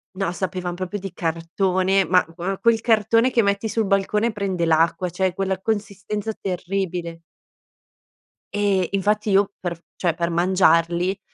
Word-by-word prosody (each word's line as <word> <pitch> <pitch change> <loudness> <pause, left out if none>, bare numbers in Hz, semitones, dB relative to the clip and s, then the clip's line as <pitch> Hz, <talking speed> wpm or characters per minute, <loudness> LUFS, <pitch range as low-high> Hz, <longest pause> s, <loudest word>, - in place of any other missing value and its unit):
No, 195 -2 -1
sapevan 180 -1 -3
proprio 185 +3 -4
di 195 0 -6
cartone, 185 +3 0
ma 180 +2 +4
gua 190 +3 -3
quel 225 +1 +3
cartone 230 +2 +3
che 235 - +3
metti 200 +1 0
sul 220 -1 -1
balcone, 210 +3 +1
prende 195 -4 -2
l'acqua, 165 +3 +2
cioè 185 +1 -1
quella 190 0 -2
consistenza 210 0 -3
terribile. 180 -2 -3 1.3
E, 200 -4 +1
infatti 210 +2 0
io 200 +1 +3
per 170 -2 -4 0.2
cioè 175 -3 0
per 170 +1 -2
mangiarli 175 +1 +2
190 Hz, 140 wpm, -22 LUFS, 175-200 Hz, 1.3 s, ma